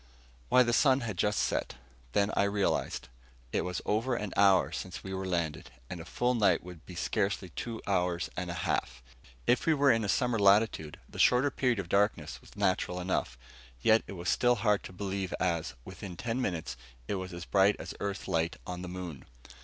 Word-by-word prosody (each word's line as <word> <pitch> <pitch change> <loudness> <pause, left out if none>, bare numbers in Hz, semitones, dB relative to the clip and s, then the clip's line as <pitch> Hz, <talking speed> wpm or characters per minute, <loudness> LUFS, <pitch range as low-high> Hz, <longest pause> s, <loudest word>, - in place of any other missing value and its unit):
Why, 125 - +6
the 120 -1 0
sun 135 +1 +4
had 110 -5 -3
just 105 +3 +1
set. - - -1 0.4
Then 100 +1 +2
I - - +3
realized. 100 0 0 0.5
It - - +2
was 90 -1 -3
over 115 +4 +1
an 105 -4 -4
hour 95 -7 +5
since 90 -1 -6
we 95 - -6
had 95 0 -3
landed, 80 -7 -2 0.2
and 90 - -5
a 80 - -8
full 125 +7 0
night 100 -8 +3
would 90 -2 -11
be 90 - -9
scarcely 95 +1 -1
two 115 +6 -6
hours 90 -3 0
and - - -3
a - - -3
half. 65 0 -1 0.4
If 125 - +2
we 160 - +5
were 140 -1 +5
in 115 -1 +2
a 100 - -2
summer 125 -2 +2
latitude, 100 -6 +3
the - - -10
shorter 125 +3 +5
period 125 -3 +1
of 100 -3 -3
darkness 100 +4 +1
was - - -17
natural 90 -1 0
enough. 90 -9 -1 0.4
And - - -24
yet 110 +1 +5
it - - -7
was 90 -1 -6
still 120 0 +3
hard 105 -4 +2
to - - -8
believe 95 0 -3
as, 85 -3 -1
within 95 -1 -8
ten 120 +5 -2
minutes, 85 - -3 0.3
it - - -1
was 95 0 -6
as 85 -1 -7
bright 100 +1 +4
as - - -7
Earth 100 -1 -3
light 85 0 0
on 90 0 -5
the 90 - -6
moon. 90 -6 -7
95 Hz, 205 wpm, -30 LUFS, 90-110 Hz, 0.5 s, Why